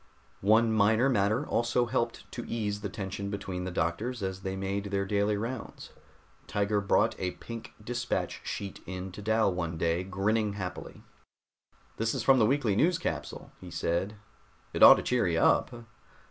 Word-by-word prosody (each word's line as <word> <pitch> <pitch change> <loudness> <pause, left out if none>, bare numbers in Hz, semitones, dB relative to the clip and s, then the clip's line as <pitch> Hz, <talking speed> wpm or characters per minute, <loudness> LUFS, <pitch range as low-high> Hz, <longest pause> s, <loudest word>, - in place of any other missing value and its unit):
One 110 +3 +4
minor 110 +5 +4
matter 110 +3 +1
also 120 0 +1
helped 115 0 -2
to - - -5
ease 105 -3 -2
the 100 - -3
tension 100 +1 -5
between 95 -3 -4
the - - -2
doctors 100 +8 -2
as 95 0 -3
they 95 0 -3
made 95 +1 -3
their 100 -1 -1
daily 100 +1 +1
rounds. 115 +5 -6 0.6
Tiger 105 0 0
brought 100 - +2
a 90 -1 -2
pink 115 -1 -9
dispatch 120 +2 -2
sheet 100 -2 -5
in 95 0 -5
to 100 - -9
Dal 110 -1 +2
one 85 -2 -3
day, 85 +2 0
grinning 100 +3 0
happily. 95 -3 -7 0.9
"This 115 +3 0
is 125 - -2
from 135 0 +5
the 110 - +5
weekly 125 -6 +1
news 170 - +3
capsule," - - -5
he 90 - -9
said. 85 +4 -1 0.6
"It - - -3
ought - - +11
to - - -3
cheer 125 -5 +1
you 85 -1 +1
up." - - +4
100 Hz, 170 wpm, -29 LUFS, 95-115 Hz, 0.9 s, ought